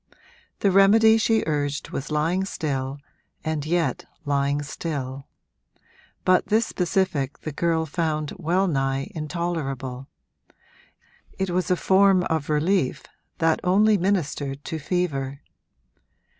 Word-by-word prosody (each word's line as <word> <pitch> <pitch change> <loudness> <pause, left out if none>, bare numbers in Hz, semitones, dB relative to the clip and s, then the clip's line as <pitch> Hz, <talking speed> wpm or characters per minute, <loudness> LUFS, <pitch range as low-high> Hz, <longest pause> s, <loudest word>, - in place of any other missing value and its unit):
The 200 - +3
remedy 220 +4 +6
she 225 0 +2
urged 145 -2 -2
was 135 - -4
lying 160 +5 +1
still 140 -7 -3 0.5
and 155 -2 -2
yet 165 -6 0 0.2
lying 140 0 0
still; 140 -3 -5 1.0
but 185 0 +3
this 220 +2 +3
specific 180 - -1
the 155 - -4
girl 160 +2 0
found 155 -1 -2
well 180 +5 +1
nigh 135 -4 -1
intolerable 145 -5 -4 1.3
it 190 -1 -1
was 180 +1 0
a 180 - +4
form 190 0 +4
of 160 -2 -1
relief 155 0 +1 0.3
that 165 -1 +2
only 210 +4 +4
ministered 150 -7 -1
to 160 - -4
fever. 140 -4 -2
160 Hz, 115 wpm, -24 LUFS, 140-185 Hz, 1.3 s, remedy